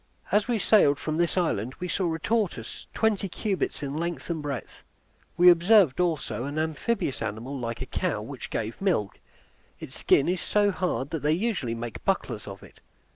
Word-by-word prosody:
As 210 +1 +3
we 240 -2 +1
sailed 190 -8 +4
from 155 +1 -3
this 170 +2 +1
island 130 - 0
we 180 - -3
saw 180 -1 0
a 160 - -1
tortoise 185 - -2
twenty 210 -3 +1
cubits 195 -5 -2
in 140 0 -3
length 170 +2 -3
and 160 -2 -2
breadth. 145 -3 -5 0.6
We 180 0 +9
observed 175 - +5
also 150 -10 0
an 145 +2 -4
amphibious 160 - -1
animal 110 +5 -4
like 115 0 -3
a - - -7
cow, 175 - -1
which 130 +3 -7
gave 110 - -4
milk; 165 - 0 0.6
its - - -8
skin 140 - +3
is 180 0 0
so 205 -1 +2
hard 180 -7 -2
that 160 - -2
they 150 +1 +2
usually 170 - -1
make 115 -1 -6
bucklers - - -1
of - - -9
it. - - -16
160 Hz, 180 wpm, -27 LUFS, 135-190 Hz, 0.6 s, We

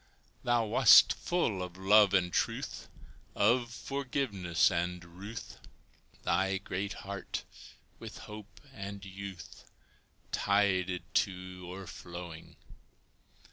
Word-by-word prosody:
Thou 120 -1 +2
wast 110 0 +7
full 120 - -1
of 90 0 -6
love 100 +1 +5
and 90 -2 +2
truth, - - -2 0.5
Of 120 +3 +3
forgiveness 120 -12 0
and 90 0 -2
ruth 100 +6 -9 0.6
Thy 95 +1 +1
great 100 0 -4
heart 100 0 -5 0.5
with - - -8
hope 105 0 -11
and 100 -3 -7
youth 95 -1 -9 0.7
Tided 95 -3 +1
to 90 -1 -1
o'erflowing. 90 -3 -8
95 Hz, 95 wpm, -31 LUFS, 90-105 Hz, 0.7 s, wast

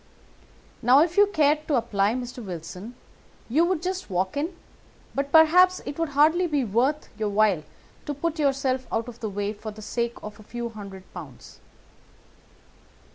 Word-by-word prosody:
Now, 255 +5 +6
if 340 0 -3
you 410 0 +6
cared 305 -4 +2
to 295 - +2
apply, 210 -2 +1
Mr. 245 -1 -6
Wilson, 185 +5 -7 0.5
you 295 +8 +3
would 345 -2 -1
just 370 -3 -3
walk 185 +3 -1
in; 320 +5 -2 0.6
but 275 0 -2
perhaps 360 +3 +6
it 285 - -6
would 330 -2 0
hardly 320 +5 +5
be 295 -4 0
worth 250 +8 0
your 215 -1 0
while 205 -5 +3 0.5
to 290 - -2
put 330 +3 -2
yourself 270 -3 0
out 225 +1 -1
of 240 -1 -10
the 220 - -3
way 205 +1 -2
for 215 +1 -8
the 215 0 -10
sake 235 +2 -2
of 210 +1 -8
a - - -12
few 235 +2 -5
hundred 200 -4 -9
pounds. 145 -9 -11
250 Hz, 170 wpm, -25 LUFS, 210-310 Hz, 0.6 s, Now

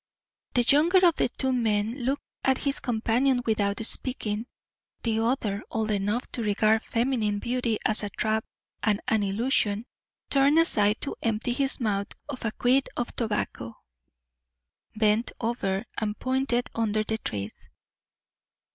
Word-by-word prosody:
The 245 - +4
younger 335 +9 +5
of 340 -3 +4
the - - +2
two 265 +1 -1
men 230 +1 0
looked 275 +2 -1 0.2
at 265 -1 +3
his 280 -1 0
companion 245 +2 +1
without 215 0 0
speaking. 225 -3 -2 0.6
The 225 -1 +1
other, 225 -4 0
old 220 -1 -1
enough 205 +4 0
to 240 - -2
regard 215 +1 +2
feminine 230 -4 0
beauty 235 0 -1
as 215 - +5
a 205 - -3
trap 220 +2 -1 0.4
and 210 -1 +1
an 220 -1 +2
illusion, 210 +1 +1 0.5
turned 280 +2 +4
aside 210 -10 +3
to 280 - -3
empty 225 +2 0
his 270 +1 +2
mouth 200 -4 0 0.2
of 270 -3 -6
a 225 - +1
quid 255 +4 +2
of 240 - -3
tobacco, 210 - -3 1.2
bent 215 +2 +2
over, 225 -3 -1
and 210 -1 -2
pointed 255 -2 0
under 215 -1 0
the 220 +1 -2
trees. 100 - -5
225 Hz, 140 wpm, -27 LUFS, 210-255 Hz, 1.2 s, younger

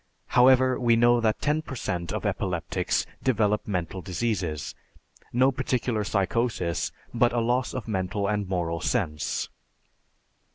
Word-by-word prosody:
However, 130 +1 +5
we 120 -2 +4
know 120 +1 +4
that 110 -1 +1
ten 150 +2 +1
per 140 - -8
cent 85 -7 -3
of - - -3
epileptics - - -1 0.2
develop 105 -4 +1
mental 90 -2 -3
diseases, 90 -6 -2 0.6
no 130 +3 +4
particular 125 -4 -1
psychosis 100 -3 0 0.2
but 120 0 +3
a 120 - +1
loss 125 +2 +1
of 125 -4 -5
mental 100 0 -1
and 105 -2 -1
moral 85 -3 -1
sense. 85 -8 -1
110 Hz, 130 wpm, -26 LUFS, 95-125 Hz, 0.6 s, However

